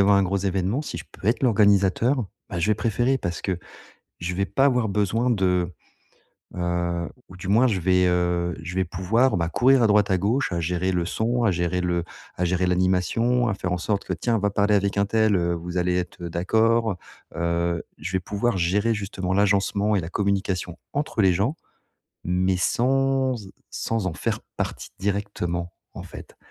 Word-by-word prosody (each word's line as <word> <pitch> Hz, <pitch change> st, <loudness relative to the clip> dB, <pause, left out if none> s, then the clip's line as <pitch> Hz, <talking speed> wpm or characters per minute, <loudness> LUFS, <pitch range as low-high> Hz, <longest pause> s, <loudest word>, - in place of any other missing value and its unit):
avoir 100 Hz, 0 st, +5 dB
un -, -, +3 dB
gros 95 Hz, +1 st, 0 dB
événement, 95 Hz, +6 st, -1 dB
si -, -, -6 dB
je -, -, -8 dB
peux -, -, -10 dB
être 115 Hz, +5 st, +1 dB
l'organisateur, 105 Hz, +2 st, +3 dB, 0.2 s
bah, 90 Hz, -, -3 dB
je 85 Hz, -, +1 dB
vais 110 Hz, -, +4 dB
préférer 120 Hz, +5 st, +1 dB
parce 85 Hz, -9 st, -4 dB
que 95 Hz, -3 st, -2 dB, 0.6 s
je 90 Hz, +1 st, -3 dB
vais 100 Hz, +1 st, 0 dB
pas 135 Hz, -, +1 dB
avoir 125 Hz, -5 st, +2 dB
besoin 105 Hz, +4 st, +1 dB
de, 90 Hz, -5 st, +1 dB, 0.8 s
heu 85 Hz, -1 st, -1 dB, 0.2 s
ou 95 Hz, -, -12 dB
du 90 Hz, +1 st, -7 dB
moins 115 Hz, +6 st, +5 dB
je 105 Hz, -7 st, 0 dB
vais, 90 Hz, +1 st, +3 dB
heu, 85 Hz, -1 st, 0 dB
je 90 Hz, +2 st, -6 dB
vais 95 Hz, -, +2 dB
pouvoir, 115 Hz, +8 st, +1 dB
bah, 85 Hz, -1 st, -1 dB
courir 130 Hz, +4 st, +4 dB
à -, -, +5 dB
droite 105 Hz, -1 st, +3 dB
à 95 Hz, -, +4 dB
gauche 105 Hz, +5 st, 0 dB
à 85 Hz, -, -1 dB
gérer 90 Hz, +3 st, -1 dB
le 90 Hz, -2 st, 0 dB
son, 115 Hz, +7 st, -1 dB
à 110 Hz, -, +4 dB
gérer 90 Hz, 0 st, -1 dB
le 85 Hz, -1 st, 0 dB, 0.3 s
à 90 Hz, -, 0 dB
gérer 90 Hz, +1 st, +1 dB
l'animation, 95 Hz, +7 st, +2 dB
à 105 Hz, -, +1 dB
faire 90 Hz, -2 st, -3 dB
en 90 Hz, -, -1 dB
sorte 100 Hz, +3 st, -1 dB
que: -, -, -2 dB
«Tiens 115 Hz, -2 st, 0 dB
va 105 Hz, 0 st, +1 dB
parler 100 Hz, +1 st, +2 dB
avec 100 Hz, 0 st, +1 dB
un 100 Hz, -, +3 dB
tel, 110 Hz, 0 st, +2 dB
heu, 85 Hz, -1 st, +1 dB
vous 85 Hz, +1 st, -5 dB
allez 90 Hz, 0 st, +1 dB
être 90 Hz, 0 st, -4 dB
d'accord, 110 Hz, +4 st, +1 dB, 0.4 s
heu», 85 Hz, 0 st, 0 dB, 0.2 s
je 90 Hz, +5 st, -5 dB
vais 95 Hz, -, +1 dB
pouvoir 100 Hz, +4 st, -1 dB
gérer 100 Hz, +6 st, +1 dB
justement 95 Hz, -3 st, -3 dB
l'agencement 100 Hz, +1 st, +2 dB
et -, -, +2 dB
la 80 Hz, -, -6 dB
communication 95 Hz, -2 st, -1 dB, 0.2 s
entre 145 Hz, -5 st, -1 dB
les 95 Hz, -3 st, +4 dB
gens 115 Hz, -, 0 dB, 0.7 s
mais 90 Hz, +1 st, +1 dB
sans 135 Hz, +5 st, +1 dB
e -, -, -12 dB, 0.2 s
sans 115 Hz, -4 st, -2 dB
en 95 Hz, -, -1 dB
faire -, -, -2 dB, 0.2 s
partie -, -, -3 dB
directement, 95 Hz, -4 st, -2 dB, 0.2 s
en -, -, -7 dB
fait. -, -, -11 dB
95 Hz, 195 wpm, -24 LUFS, 90-110 Hz, 0.8 s, avoir